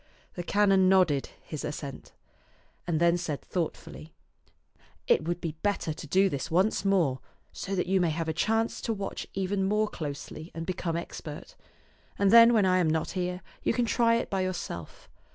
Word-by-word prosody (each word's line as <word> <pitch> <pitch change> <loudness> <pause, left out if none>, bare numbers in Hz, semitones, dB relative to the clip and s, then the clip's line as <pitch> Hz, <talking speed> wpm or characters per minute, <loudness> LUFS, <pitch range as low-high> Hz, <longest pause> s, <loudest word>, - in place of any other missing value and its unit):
The - - -4
canon 195 0 +3
nodded 180 -8 +3
his 155 - -6
assent, 140 -2 -6 0.8
and 165 -3 +1
then 170 +1 +3
said 155 -5 -3
thought 175 -3 -3
fully, 155 +1 -12 0.4
" - - -34
It - - -6
would 175 0 -1
be 165 - -3
better 205 -6 0
to 155 - -9
do 190 +6 +4
this 140 -8 -3
once 190 +4 +2
more, 175 -10 +2 0.3
so 195 - -4
that 180 - 0
you 190 +1 +2
may 175 - +2
have 165 +1 -2
a 160 - 0
chance 225 +6 0
to 225 - -1
watch 200 -2 -5
even 195 0 -1
more 210 +2 +2
closely 155 -1 -6
and 165 0 -4
become 175 -2 -2
expert; 160 -2 -7 0.6
and 200 -1 +3
then 230 0 +9
when 215 -4 +4
I 185 0 +3
am 170 -3 +2
not 160 0 0
here 180 0 -3 0.2
you - - +1
can 245 0 +1
try 230 0 +3
it 230 - -1
by 195 -1 0
yourself. 175 - -5
180 Hz, 190 wpm, -28 LUFS, 160-195 Hz, 0.8 s, then